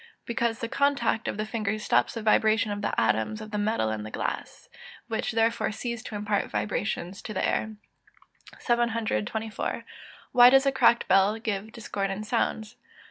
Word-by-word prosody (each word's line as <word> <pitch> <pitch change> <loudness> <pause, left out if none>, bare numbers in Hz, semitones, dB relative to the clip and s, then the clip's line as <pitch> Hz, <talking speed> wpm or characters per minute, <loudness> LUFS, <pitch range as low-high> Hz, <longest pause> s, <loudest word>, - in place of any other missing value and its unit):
_ - - -21 0.2
Because 235 -1 -1
the 230 - -2
contact 280 -4 +1
of - - -2
the 215 - -2
finger 215 -1 -2
stops 215 - +1
the 230 - -4
vibration 215 0 +3
of 205 0 -3
the - - -1
atoms 110 - +1
of 215 0 -9
the 210 - -2
metal 205 - 0
and 110 0 -4
glass, - - -4 0.4
which 225 -2 -2
therefore 225 -1 +1
cease 235 +1 -4
to 220 - -8
impart 205 0 -1
vibrations 175 - -3
to 215 - -7
the - - +1
air. 220 0 -1 0.8
724. 225 - -1 0.5
_Why 245 0 +9
does 270 +1 +5
a 275 - +4
cracked 235 -3 +3
bell 195 +3 +4
give 215 -1 -3
discordant 200 -2 -4
sounds? 220 -1 -1
215 Hz, 165 wpm, -27 LUFS, 205-230 Hz, 0.8 s, Why